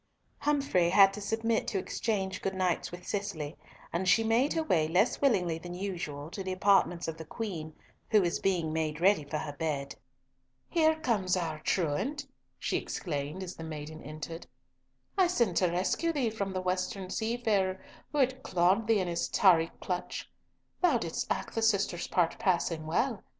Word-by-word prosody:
Humfrey 275 Hz, -13 st, +2 dB
had 195 Hz, +1 st, +7 dB
to 210 Hz, -, -6 dB
submit 225 Hz, +2 st, 0 dB
to 205 Hz, -, -1 dB
exchange 190 Hz, -1 st, -2 dB
good 195 Hz, 0 st, -2 dB
nights 185 Hz, -2 st, 0 dB
with 180 Hz, +1 st, -9 dB
Cicely, 180 Hz, -7 st, -3 dB, 0.4 s
and 185 Hz, +2 st, +1 dB
she 225 Hz, -, +5 dB
made 230 Hz, +6 st, +2 dB
her 325 Hz, -, 0 dB
way 160 Hz, -, +2 dB
less 180 Hz, +8 st, +2 dB
willingly 180 Hz, -, +2 dB
than 175 Hz, +1 st, -7 dB
usual 170 Hz, -6 st, -4 dB
to 195 Hz, -, -5 dB
the 190 Hz, -, -3 dB
apartments 185 Hz, -2 st, +3 dB
of 165 Hz, -1 st, -4 dB
the 160 Hz, -, -7 dB
Queen, 160 Hz, -4 st, -5 dB, 0.3 s
who 215 Hz, -, +6 dB
was 175 Hz, -1 st, 0 dB
being 175 Hz, -5 st, 0 dB
made 155 Hz, -1 st, -1 dB
ready 190 Hz, -2 st, +4 dB
for 145 Hz, +2 st, -3 dB
her 150 Hz, -1 st, -4 dB
bed. 145 Hz, -2 st, -2 dB, 0.7 s
"Here 320 Hz, -2 st, +3 dB
comes 190 Hz, -9 st, +1 dB
our 160 Hz, -3 st, -2 dB
truant," 195 Hz, -, -1 dB, 0.3 s
she -, -, -1 dB
exclaimed 150 Hz, +2 st, -4 dB
as 180 Hz, -, -6 dB
the 165 Hz, -, -8 dB
maiden 155 Hz, 0 st, -7 dB
entered. 155 Hz, +3 st, -7 dB, 0.7 s
"I 370 Hz, -, +6 dB
sent 235 Hz, -, +1 dB
to 185 Hz, -, +4 dB
rescue 185 Hz, -, 0 dB
thee 265 Hz, -8 st, 0 dB
from 200 Hz, -3 st, -3 dB
the 185 Hz, -, -1 dB
western 185 Hz, +1 st, -2 dB
seafarer 220 Hz, -5 st, 0 dB, 0.3 s
who 295 Hz, -, -3 dB
had 260 Hz, -1 st, +2 dB
clawed 185 Hz, +2 st, +2 dB
thee 220 Hz, -3 st, +4 dB
in 185 Hz, -, -2 dB
his 170 Hz, -1 st, -1 dB
tarry 165 Hz, -4 st, +4 dB
clutch. 180 Hz, -1 st, -3 dB, 0.5 s
Thou 340 Hz, -9 st, +4 dB
didst 170 Hz, -7 st, -3 dB
act -, -, -2 dB
the 225 Hz, -, -1 dB
sister's 200 Hz, -5 st, +1 dB
part 175 Hz, +3 st, +1 dB
passing 170 Hz, -6 st, 0 dB
well. 225 Hz, +6 st, 0 dB
185 Hz, 175 wpm, -30 LUFS, 165-220 Hz, 0.7 s, had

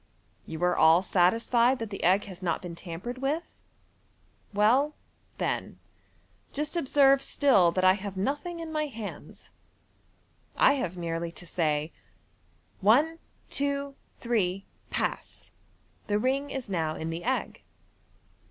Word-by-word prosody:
You 160 Hz, +1 st, -5 dB
are 180 Hz, 0 st, +3 dB
all 165 Hz, +3 st, +5 dB
satisfied 230 Hz, +8 st, +3 dB
that 225 Hz, -3 st, -6 dB
the 195 Hz, -, -5 dB
«•• -, -, -7 dB
• -, -, -5 dB
r 185 Hz, +3 st, +5 dB
has 185 Hz, -2 st, -10 dB
not 170 Hz, -3 st, 0 dB
been 175 Hz, -1 st, -6 dB
tampered 180 Hz, +9 st, -7 dB
with? 290 Hz, +5 st, -1 dB, 1.1 s
Well, 245 Hz, +9 st, +3 dB, 0.4 s
then, -, -, -2 dB, 0.7 s
just 300 Hz, +3 st, -3 dB
observe 275 Hz, -3 st, +4 dB
still 205 Hz, -, +4 dB
that 185 Hz, -, 0 dB
I 185 Hz, 0 st, +7 dB
have 195 Hz, -1 st, -6 dB
nothing 290 Hz, -, -2 dB
in 325 Hz, -1 st, -6 dB
my 305 Hz, -1 st, -1 dB
hands. 225 Hz, -6 st, -9 dB, 1.1 s
I 275 Hz, -, +6 dB
have 185 Hz, -10 st, -3 dB
merely 170 Hz, 0 st, -3 dB
to 180 Hz, -, -10 dB
say, 155 Hz, -2 st, -1 dB, 0.4 s
' -, -, -38 dB
One, 320 Hz, +7 st, +3 dB, 0.3 s
two, 280 Hz, 0 st, -1 dB, 0.3 s
three! 195 Hz, -5 st, 0 dB, 0.2 s
Pass!' -, -, -4 dB, 0.6 s
The 205 Hz, -, +1 dB
ring 270 Hz, +5 st, 0 dB
is 265 Hz, -3 st, -5 dB
now 165 Hz, -5 st, -1 dB
in 160 Hz, +1 st, -4 dB
the 165 Hz, +1 st, -5 dB
egg. 260 Hz, +2 st, -2 dB
210 Hz, 140 wpm, -28 LUFS, 175-275 Hz, 1.1 s, I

